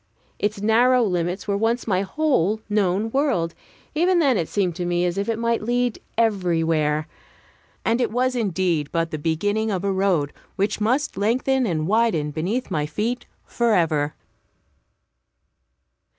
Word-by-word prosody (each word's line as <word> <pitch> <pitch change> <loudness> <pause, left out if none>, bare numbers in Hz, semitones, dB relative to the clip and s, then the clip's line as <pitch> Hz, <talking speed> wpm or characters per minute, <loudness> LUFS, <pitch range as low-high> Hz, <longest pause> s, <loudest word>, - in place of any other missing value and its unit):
Its 205 0 -1
narrow 245 +3 +4
limits 180 -1 -1
were 200 - +1
once 225 +3 0
my 190 -4 +1
whole 215 - +1
known 205 +1 +1
world. 250 - +1 0.4
Even 350 +4 +3
then 280 -7 +3
it 170 -6 -1
seemed 185 -5 0
to 180 - -3
me 175 0 0
as 175 -1 -1
if 200 +2 -2
it 225 - 0
might 230 0 0
lead 245 +1 0 0.2
everywhere; 165 -8 +1 0.8
and 230 +2 +2
it - - +1
was 255 +3 0
indeed 185 -9 0
but 165 -1 -1
the 155 - -3
beginning 205 +8 0
of 190 -3 -2
a 200 - +1
road 190 -7 +1 0.2
which 205 +2 -1
must 255 +7 0
lengthen 255 +4 +1
and 155 -4 -1
widen 200 -9 +2
beneath 190 - -2
my 150 -1 0
feet 225 +10 -3 0.2
forever. 165 -11 +1
205 Hz, 150 wpm, -23 LUFS, 170-235 Hz, 0.8 s, narrow